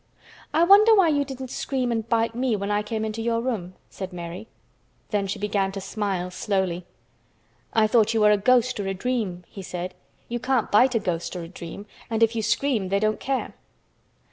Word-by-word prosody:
"I 320 +3 +3
wonder 415 +5 +7
why 380 -5 +5
you 290 -2 +2
didn't 265 -2 -7
scream 255 -3 -1
and 225 -1 -2
bite 230 -1 +1
me 245 -1 0
when 200 0 -3
I 205 0 +2
came 220 +1 -3
into 220 +1 -4
your 230 0 0
room?" 215 -8 -3 0.2
said 190 -1 -6
Mary. 175 +3 -7 0.6
Then 205 -2 0
she 200 - -3
began 200 -1 0
to 195 - -4
smile 190 -2 -3
slowly. 185 -2 -1 0.9
"I 220 -1 +4
thought 220 0 +3
you 220 - +3
were 210 0 +6
a 210 - +5
ghost 250 +3 +3
or 200 - -2
a 195 - -2
dream," 205 -5 -2
he 195 - -9
said. 180 0 -5 0.3
"You 240 0 -3
can't 255 -2 0
bite 250 +4 +5
a - - +4
ghost 175 -3 -3
or 175 - -4
a - - -7
dream, 175 +3 -9 0.2
and 225 0 +2
if 225 +1 +3
you 225 - 0
scream 225 -2 0
they 200 +1 +2
don't 215 +1 0
care." 270 -1 -2
215 Hz, 205 wpm, -25 LUFS, 195-245 Hz, 0.9 s, wonder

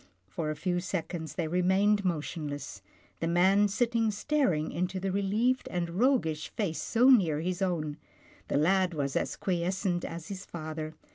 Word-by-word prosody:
For 155 - -3
a 155 - -2
few 175 +3 -1
seconds, 170 -3 -4
they 170 -4 -1
remained 190 +4 +2
motion 160 -3 -2
less 145 -10 -6 0.2
— - - -33
the 165 - -1
man 190 +4 +4
sitting 230 +2 +1
staring 205 - 0
into 180 +2 -2
the 190 +1 -2
relieved 210 +7 +1
and 170 -1 -2
roguish 180 - +1
face 190 -7 -2
so 245 +3 +4
near 170 - +4
his 180 +2 -2
own. 155 -6 -1 0.5
The - - 0
lad 180 +3 +2
was 140 -2 -2
as - - -1
quiescent 180 0 -1
as 165 -1 -6
his 195 -1 -6
father. 155 -2 -6
180 Hz, 165 wpm, -29 LUFS, 160-200 Hz, 0.5 s, man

